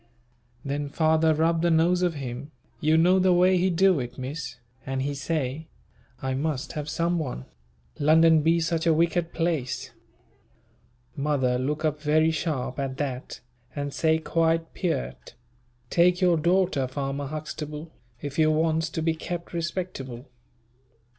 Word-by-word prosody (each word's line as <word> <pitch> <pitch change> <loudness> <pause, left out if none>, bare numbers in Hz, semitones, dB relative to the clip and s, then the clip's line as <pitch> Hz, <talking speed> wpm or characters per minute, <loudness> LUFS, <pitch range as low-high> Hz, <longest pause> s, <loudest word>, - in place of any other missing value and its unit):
Then 145 +1 -2
father 160 +1 +3
rub 160 +1 +2
the 170 - +2
nose 170 +2 +3
of 175 -3 +1
him, 135 0 -6 0.3
you 155 +1 +3
know 180 +3 +5
the 185 -1 +4
way 180 +1 +4
he 185 +2 +2
do 185 -1 +3
it, 125 -1 -6
Miss, 130 -1 -5 0.3
and 135 0 -2
he 145 +1 -2
say, 145 +1 -3 0.6
"I 130 0 -1
must 145 +1 -2
have 150 0 -5
some 170 +3 0
one. 125 - -4 0.5
London 160 +1 +5
be 165 +2 +3
such 165 0 0
a 160 - +5
wicked 170 +1 +1
place." 155 -6 -2 1.2
Mother 140 -4 +1
look 150 +4 -1
up 150 -1 -1
very 155 +2 +3
sharp 150 -5 -2
at 135 -1 -3
that, 135 -3 -4 0.3
and 145 -1 -3
say 160 -1 +2
quite 165 0 0
peart, 65 - -3 0.6
"take 180 +1 +4
your 180 -2 +4
daughter, 170 -4 +2
farmer 135 +1 -3
Huxtable, 155 +1 -6 0.3
if 145 +2 -4
you 155 0 +5
wants 160 +1 +1
to 160 0 -3
be 165 0 +2
kept 170 +2 -6
respectable." 165 -8 -4
155 Hz, 145 wpm, -26 LUFS, 140-165 Hz, 1.2 s, know